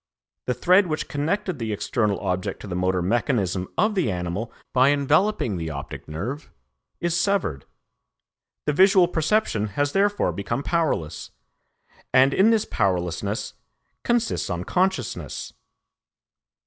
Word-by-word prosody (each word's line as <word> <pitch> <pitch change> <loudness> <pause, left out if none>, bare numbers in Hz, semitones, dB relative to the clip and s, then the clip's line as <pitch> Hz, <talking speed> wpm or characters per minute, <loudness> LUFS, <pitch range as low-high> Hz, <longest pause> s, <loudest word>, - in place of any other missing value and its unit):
The 125 - 0
thread 185 +2 +4
which 155 -1 -2
connected 170 +3 -2
the 110 -2 -2
external 105 -1 0
object 95 +2 -2
to - - -8
the 95 - -5
motor 90 0 0
mechanism 100 -3 0
of 215 0 +3
the 185 - +1
animal 90 +4 -3 0.2
by 130 +1 +5
enveloping 145 - +2
the 80 -1 -4
optic 70 -2 -7
nerve, 120 - -5 0.5
is 170 -1 0
severed; 175 - 0 1.0
the 150 - +1
visual 190 +2 +6
perception 160 - +1
has 145 0 +1
therefore 205 +3 +2
become 100 +7 -3
powerless, 90 - -1 0.8
and 130 +2 +5
in 200 +4 +5
this 225 -2 +2
powerlessness 90 -4 -1 0.5
consists 240 - 0
unconsciousness." 180 - -2
135 Hz, 120 wpm, -24 LUFS, -, 1.0 s, visual